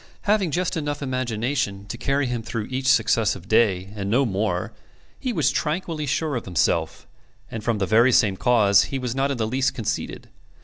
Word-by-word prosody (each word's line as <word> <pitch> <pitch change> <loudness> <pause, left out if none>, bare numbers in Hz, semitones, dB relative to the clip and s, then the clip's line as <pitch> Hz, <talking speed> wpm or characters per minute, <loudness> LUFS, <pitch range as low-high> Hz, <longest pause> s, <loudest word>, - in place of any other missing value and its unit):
Having 205 -4 +2
just 175 +3 -1
enough 145 -2 -3
imagination 120 -5 -2
to 100 - -6
carry 140 +1 0
him 120 -2 -2
through 110 -1 -4
each 130 0 -2
successive 110 -6 +2
day, 100 -4 +2
and 100 -1 -4
no 130 +6 +3
more, 95 -4 -2 0.5
he 255 - -2
was 160 - +1
tranquilly 155 -1 -2
sure 150 +1 -1
of 120 - -4
himself; 90 -4 0 0.5
and 110 -2 -5
from 115 -1 0
the 100 - 0
very 115 +6 +4
same 105 -5 +3
cause 105 -3 +4
he 135 - -4
was 125 -3 -3
not 135 +1 0
in 140 - -2
the 110 - 0
least 130 +4 0
conceited. 115 - -4
120 Hz, 185 wpm, -23 LUFS, 105-140 Hz, 0.5 s, very